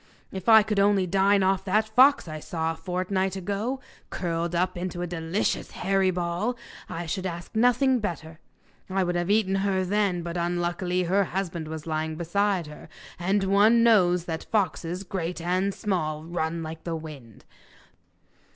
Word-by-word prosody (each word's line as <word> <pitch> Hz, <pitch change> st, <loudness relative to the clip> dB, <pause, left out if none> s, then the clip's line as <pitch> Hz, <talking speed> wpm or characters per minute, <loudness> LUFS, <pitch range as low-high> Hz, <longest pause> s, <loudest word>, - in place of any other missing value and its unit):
If 190 Hz, +2 st, -3 dB
I 220 Hz, -1 st, +8 dB
could 210 Hz, -1 st, -1 dB
only 200 Hz, -1 st, +3 dB
dine 195 Hz, +2 st, +3 dB
off 190 Hz, 0 st, +1 dB
that 215 Hz, +3 st, +2 dB
fox 260 Hz, +2 st, +5 dB
I 155 Hz, -1 st, -6 dB
saw 160 Hz, +1 st, -2 dB
a -, -, -5 dB
fortnight 185 Hz, +2 st, -2 dB
ago, 205 Hz, +7 st, -3 dB, 0.3 s
curled 170 Hz, -1 st, -2 dB
up 180 Hz, +2 st, 0 dB
into 175 Hz, 0 st, -4 dB
a -, -, -1 dB
delicious 170 Hz, +3 st, -2 dB
hairy 195 Hz, 0 st, +1 dB
ball, 180 Hz, +7 st, -2 dB, 0.3 s
I 170 Hz, -1 st, -4 dB
should 185 Hz, +3 st, -3 dB
ask 175 Hz, +3 st, -7 dB
nothing 250 Hz, +3 st, +3 dB
better; 165 Hz, -6 st, -5 dB, 0.5 s
I 190 Hz, 0 st, +1 dB
would 175 Hz, 0 st, -1 dB
have 175 Hz, +1 st, -1 dB
eaten 200 Hz, -2 st, +2 dB
her 190 Hz, -1 st, 0 dB
then, 195 Hz, -3 st, 0 dB
but 170 Hz, +1 st, -4 dB
unluckily 175 Hz, +1 st, -1 dB
her 190 Hz, +3 st, +2 dB
husband 175 Hz, -4 st, -4 dB
was 155 Hz, -1 st, -6 dB
lying 155 Hz, 0 st, -2 dB
beside 185 Hz, +2 st, 0 dB
her, 150 Hz, 0 st, -12 dB, 0.3 s
and 195 Hz, +3 st, +1 dB
one 210 Hz, +4 st, +4 dB
knows 180 Hz, -7 st, +4 dB
that 165 Hz, -2 st, -5 dB
foxes, 185 Hz, -3 st, -1 dB
great 180 Hz, -2 st, -4 dB
and 185 Hz, +4 st, 0 dB
small, 155 Hz, -8 st, -2 dB
run 165 Hz, 0 st, -3 dB
like 160 Hz, 0 st, -7 dB
the 170 Hz, -1 st, -3 dB
wind. 145 Hz, -9 st, -10 dB
180 Hz, 165 wpm, -26 LUFS, 170-200 Hz, 0.5 s, I